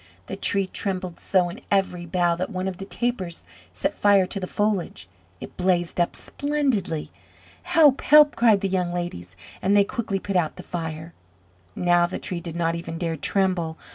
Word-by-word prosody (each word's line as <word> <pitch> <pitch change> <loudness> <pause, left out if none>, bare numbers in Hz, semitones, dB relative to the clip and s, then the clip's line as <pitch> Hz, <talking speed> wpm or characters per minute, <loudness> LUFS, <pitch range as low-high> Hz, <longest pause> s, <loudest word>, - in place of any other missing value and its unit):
The - - -5
Tree 195 -1 0
trembled 185 -2 -4
so 185 -2 +2
in 175 - -9
every 185 -3 0
bough 175 0 +1
that 185 +2 -3
one 185 -2 -3
of 185 -2 -4
the 195 - -7
tapers 215 -6 -3 0.3
set - - -2
fire 200 -2 +4
to 195 - -5
the 185 - -4
foliage. 200 - -2 0.3
It - - -10
blazed 180 -2 0
up 175 - +1
splendidly. 265 - -2 0.5
"Help! 325 -6 +4
Help!" 300 0 +6
cried 220 -4 +4
the 195 - 0
young 180 -2 -1
ladies, 135 - -5 0.3
and 200 +2 +3
they 200 - +6
quickly 200 -1 -3
put 195 0 -4
out 170 -4 +1
the - - -9
fire. 165 -1 -5 0.6
Now 175 -1 +3
the 180 - -5
Tree 175 -2 -4
did 170 -1 -7
not 165 -1 0
even 170 -1 -5
dare 165 -1 -2
tremble. 175 -1 0
185 Hz, 180 wpm, -24 LUFS, 170-200 Hz, 0.6 s, Help